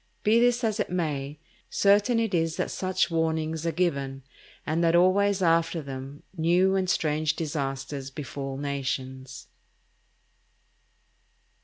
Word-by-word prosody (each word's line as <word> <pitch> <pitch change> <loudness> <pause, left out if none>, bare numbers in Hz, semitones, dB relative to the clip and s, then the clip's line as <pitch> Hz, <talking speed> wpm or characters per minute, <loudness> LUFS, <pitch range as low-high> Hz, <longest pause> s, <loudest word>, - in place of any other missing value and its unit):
Be 220 +2 +4
this 245 0 +3
as 220 -1 0
it - - -1
may, 150 -5 -2 0.3
certain 205 +4 +3
it 225 -3 -1
is 165 -1 +1
that - - -1
such 185 -1 0
warnings 160 0 -1
are - - +1
given, 140 -6 -1 0.4
and 160 +2 0
that 165 0 +3
always 190 +2 +3
after 165 0 +2
them 135 0 -8
new 180 +3 +3
and 190 -1 0
strange 155 -3 +1
disasters 135 -3 -4
befall 135 -1 -6
nations. 130 -2 -4
160 Hz, 125 wpm, -27 LUFS, 140-185 Hz, 0.4 s, Be